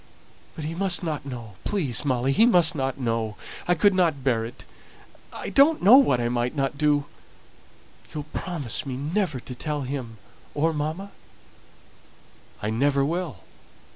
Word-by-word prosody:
"But 155 - -6
he 160 - -3
must 185 0 +3
not 150 -4 -3
know 120 -5 -7
please, 150 - -1
Molly, 130 -2 +1
he 220 +11 +5
must 175 -8 +5
not 135 -3 -3
know. 115 -4 -2 0.3
I 175 - +3
couldn't 175 -6 +2
bear 120 -4 +1
it. 115 +2 -9 0.7
I - - -6
don't 295 - +4
know 220 +8 +9
what 235 - +4
I 120 - 0
might 120 +3 -1
not 135 0 -1
do. 145 -1 +2 1.1
You'll 150 -2 -5
promise 155 - -2
me 130 -3 -5
never 155 0 -1
to 125 - -8
tell 150 +3 -3
him, 130 -4 -5 0.4
or 160 +3 +1
mamma?" 155 +7 -4 1.5
"I 105 - -1
never 140 +4 +2
will. 160 - -3
145 Hz, 150 wpm, -25 LUFS, 125-175 Hz, 1.5 s, know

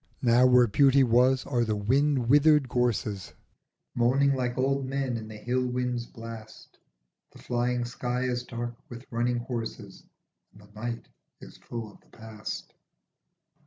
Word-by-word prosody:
Now 120 +1 +5
where 125 -1 +6
Beauty 135 +4 +4
was 125 +2 +3
are 120 -4 0
the 110 -2 -1
wind 130 +4 +1
withered 145 +1 +5
gorses 110 -6 -1 0.6
Moaning 135 +4 +3
like 125 -1 -2
old 135 +1 +1
men 135 -2 -2
in 110 -1 -6
the 110 -1 -9
hill 125 +4 -1
wind's 125 -1 -2
blast, 115 -1 -11 0.5
The - - -14
flying 120 0 -1
sky 125 +1 -3
is 125 -1 -1
dark 120 -1 -5 0.2
with 120 +1 -10
running 120 +1 0
horses 120 -2 -6 0.5
And 105 - -17
the 105 +1 -20
night 115 +2 -5 0.3
is - - -13
full 115 -3 -7
of - - -20
the - - -23
past. 110 -1 -7
120 Hz, 150 wpm, -27 LUFS, 115-130 Hz, 0.6 s, where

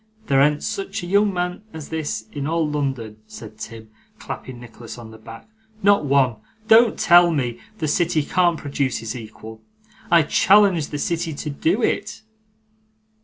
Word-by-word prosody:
There 135 -7 +3
an't 150 +1 +2
such 200 -1 -4
a - - -4
young 200 +3 +2
man 180 0 -3
as 160 -2 -8
this 150 -9 -3
in 145 -1 -4
all 165 0 0
London,' 135 -8 -4
said 110 -1 -11
Tim, 110 0 -9 0.3
clapping 130 -2 -8
Nicholas 120 0 -11
on 115 -2 -11
the 110 - -13
back; 115 - -12 0.4
'not 200 -5 +4
one. 135 -4 +2 0.3
Don't 225 0 +5
tell 175 0 +6
me! 130 -7 -2 0.2
The 155 - -2
city 165 0 +1
can't 175 +2 +1
produce 140 -3 -2
his 115 +2 -6
equal. 110 -1 -10 0.5
I 170 -1 +5
challenge 190 -1 +4
the 145 - -5
city 165 0 -2
to 150 +1 -5
do 170 - 0
it! - - -2
150 Hz, 165 wpm, -21 LUFS, 120-175 Hz, 0.5 s, tell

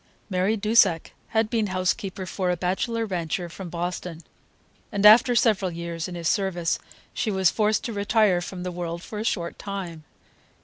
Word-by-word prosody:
Mary 190 +4 +1
Dusak 205 -5 +3 0.2
had 220 -1 +1
been 225 -3 +1
housekeeper 185 +1 -2
for 185 +1 -2
a 180 - 0
bachelor 210 +6 -1
rancher 175 -2 -3
from 180 +2 -8
Boston, 170 -1 -4 0.7
and 205 -1 0
after 240 +4 +8
several 210 -5 +3
years 170 0 -5
in 180 - -7
his 170 -2 -3
service 185 -5 0 0.3
she 220 - -1
was 190 -3 +3
forced 215 0 +1
to 235 - -4
retire 205 -3 +2
from 180 0 -6
the 180 - -3
world 170 -1 -5
for 210 - -6
a - - -2
short 170 -6 -2
time. 185 -6 -6
185 Hz, 170 wpm, -25 LUFS, 175-215 Hz, 0.7 s, after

